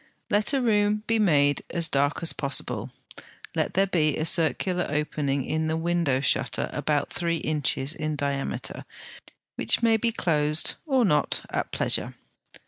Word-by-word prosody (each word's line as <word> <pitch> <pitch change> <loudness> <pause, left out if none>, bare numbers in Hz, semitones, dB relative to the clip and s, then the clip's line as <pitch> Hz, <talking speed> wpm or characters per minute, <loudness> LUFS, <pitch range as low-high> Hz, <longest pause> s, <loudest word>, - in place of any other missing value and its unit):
Let 210 +3 +2
a 270 -2 +1
room 210 -2 +2
be 225 0 +1
made 145 -8 +3
as 170 -1 +1
dark 145 +2 0
as 165 - +3
possible; 125 -4 -2 0.6
let - - -2
there 195 +1 +4
be 155 -6 +1
a 155 - -1
circular 175 +2 +2
opening 145 -2 -1
in 160 0 -1
the 160 0 -1
window 165 -5 0
shutter 140 - -1
about 145 -2 -1
three 170 -1 -1
inches 150 -2 -1
in 155 -1 -3
diameter, 140 -1 -3 0.7
which - - +2
may 225 -1 +4
be 230 +1 0
closed 155 -7 +1
or 265 -4 +3
not 150 -6 +1
at - - -3
pleasure. - - +1
155 Hz, 150 wpm, -25 LUFS, 145-190 Hz, 0.7 s, there